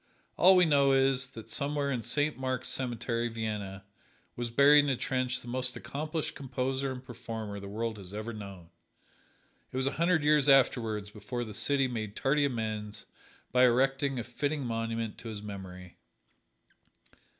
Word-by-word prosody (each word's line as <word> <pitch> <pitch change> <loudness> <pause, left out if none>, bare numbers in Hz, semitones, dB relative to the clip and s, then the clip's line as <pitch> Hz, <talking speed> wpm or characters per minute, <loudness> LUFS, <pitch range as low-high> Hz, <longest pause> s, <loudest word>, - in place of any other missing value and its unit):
All 185 +2 +7
we 180 -1 +6
know 140 -3 +4
is, 135 -1 +2
that 115 -3 -10
somewhere 140 +2 0
in 125 -3 -1
Saint 145 +6 0
Mark's 130 -1 -3
Cemetery, 120 -2 -1
Vienna, 105 -4 -4 0.5
was 120 -1 -3
buried 145 +4 +6
in - - 0
a 130 - +1
trench 130 0 -1
the - - -13
most 125 +1 0
accomplished 155 +2 -4
composer 130 0 -2
and 130 0 -8
performer 110 -4 -6
the 100 - -8
world 110 +1 -3
has 95 -2 -9
ever 110 +3 -5
known. 100 -5 -9 1.0
It - - -5
was 130 - +1
a 135 - +1
hundred 170 -3 +3
years 150 -1 +4
afterward 110 -6 +3
before 120 +3 -4
the 110 -2 -7
city 135 +5 +1
made 110 -4 -4
tardy 145 +2 +2
amends 110 -5 -3 0.5
by 125 +1 +4
erecting 135 +2 +2
a 120 - -2
fitting 140 +4 -2
monument 115 -1 -3
to 115 - -9
his 105 -2 -6
memory. 90 -3 -9
125 Hz, 160 wpm, -30 LUFS, 110-135 Hz, 1.0 s, All